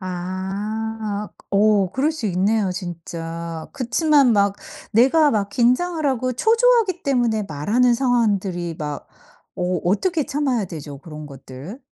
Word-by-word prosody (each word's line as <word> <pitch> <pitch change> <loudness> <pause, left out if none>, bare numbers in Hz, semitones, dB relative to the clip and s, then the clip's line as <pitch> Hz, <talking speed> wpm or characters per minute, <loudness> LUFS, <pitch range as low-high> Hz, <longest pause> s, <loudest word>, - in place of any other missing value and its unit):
아. 190 +4 -4 0.6
어 200 -2 +3
그럴 290 +5 +1
수 310 -8 -4
있네요, 195 +1 +1
진짜. 170 -2 -6
그치만 285 0 +3
막 200 -1 +2 0.4
내가 275 +7 +5
막 205 -2 0
긴장을 300 - +1
하고 255 -2 0
초조하기 450 - +3
때문에 240 -6 +1
말하는 225 - +2
상황들이 200 -9 0
막 150 -1 -5 0.5
어 180 0 -1
어떻게 310 - +1
참아야 275 -6 0
되죠, 150 -5 -8
그런 150 +1 -10
것들? 140 - -10
210 Hz, 250 characters per minute, -21 LUFS, 175-260 Hz, 0.6 s, 내가